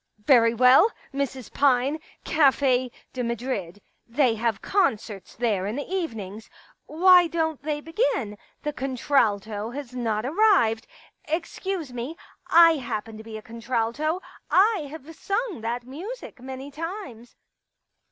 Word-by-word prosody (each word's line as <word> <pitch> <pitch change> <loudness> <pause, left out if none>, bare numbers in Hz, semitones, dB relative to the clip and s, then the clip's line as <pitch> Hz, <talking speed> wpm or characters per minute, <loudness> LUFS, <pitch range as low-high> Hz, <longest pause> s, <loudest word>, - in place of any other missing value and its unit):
*... - - -53
Very 230 +1 +4
well, 255 - +6 0.2
Mrs. 270 -3 -4
Pine. 275 +2 +2 0.2
Cafe 265 -4 +3 0.2
de 255 - -3
Madrid. 235 -6 -3 0.3
They 245 0 +2
have 225 -2 -1
concerts 215 - -1
there 210 -5 0
in 210 - -3
the 285 - -4
evenings.... 225 - -4 0.3
' - - -52
Why 355 +2 +6
don't 320 -3 -1
they 295 +1 -3
begin? 295 - -1
' - - -39
The 295 - -2
contralto 225 -6 0
has 255 0 -7
not 225 -3 -1
arrived.... 295 - +3 0.3
* - - -36
Excuse 350 -4 -5
me, 250 +7 -5 0.3
I 330 -1 +7
happen 225 -4 -5
to 220 - -10
be 220 -1 -8
a 215 - -10
contralto; 235 +8 -2 0.3
I 385 -5 +3
have 315 +1 -10
sung 400 - -2
that 235 +2 -3
music 320 - -8
many 265 +2 -7
times." 305 - -7
260 Hz, 140 wpm, -25 LUFS, 230-320 Hz, 0.3 s, I